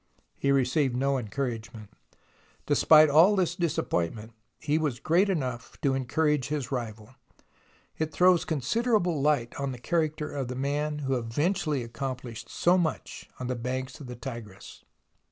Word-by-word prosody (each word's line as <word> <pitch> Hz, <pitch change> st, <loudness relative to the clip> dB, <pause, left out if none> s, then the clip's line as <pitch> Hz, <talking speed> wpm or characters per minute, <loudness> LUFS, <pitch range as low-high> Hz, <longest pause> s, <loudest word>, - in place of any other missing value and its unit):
He 140 Hz, -, 0 dB
received 135 Hz, 0 st, +2 dB
no 135 Hz, +1 st, +1 dB
encouragement. 115 Hz, -2 st, -5 dB, 0.7 s
Despite 155 Hz, -1 st, +6 dB
all 165 Hz, +8 st, +6 dB
this 180 Hz, -3 st, +1 dB
disappointment, 115 Hz, -, -2 dB, 0.2 s
he 155 Hz, +1 st, 0 dB
was 145 Hz, -6 st, -1 dB
great 180 Hz, +5 st, +2 dB
enough 130 Hz, -9 st, -3 dB
to 140 Hz, -, +2 dB
encourage 145 Hz, +1 st, 0 dB
his 145 Hz, -4 st, -3 dB
rival. 110 Hz, -2 st, -5 dB, 0.9 s
It 155 Hz, 0 st, -1 dB
throws 180 Hz, +2 st, +4 dB
considerable 175 Hz, -, 0 dB
light 140 Hz, -5 st, +1 dB
on 140 Hz, -1 st, -2 dB
the -, -, -7 dB
character 155 Hz, +3 st, -1 dB
of 135 Hz, -3 st, -3 dB
the 125 Hz, -, -5 dB
man 150 Hz, +3 st, -2 dB
who 135 Hz, -1 st, +1 dB
eventually 145 Hz, -, -1 dB
accomplished 120 Hz, -1 st, -6 dB
so 180 Hz, +2 st, +3 dB
much 160 Hz, -3 st, -3 dB
on 125 Hz, -, -4 dB
the 125 Hz, -, -1 dB
banks 130 Hz, +2 st, -4 dB
of 140 Hz, -, -9 dB
the 125 Hz, -, -7 dB
Tigris. 115 Hz, -6 st, -9 dB
140 Hz, 145 wpm, -28 LUFS, 125-155 Hz, 0.9 s, Despite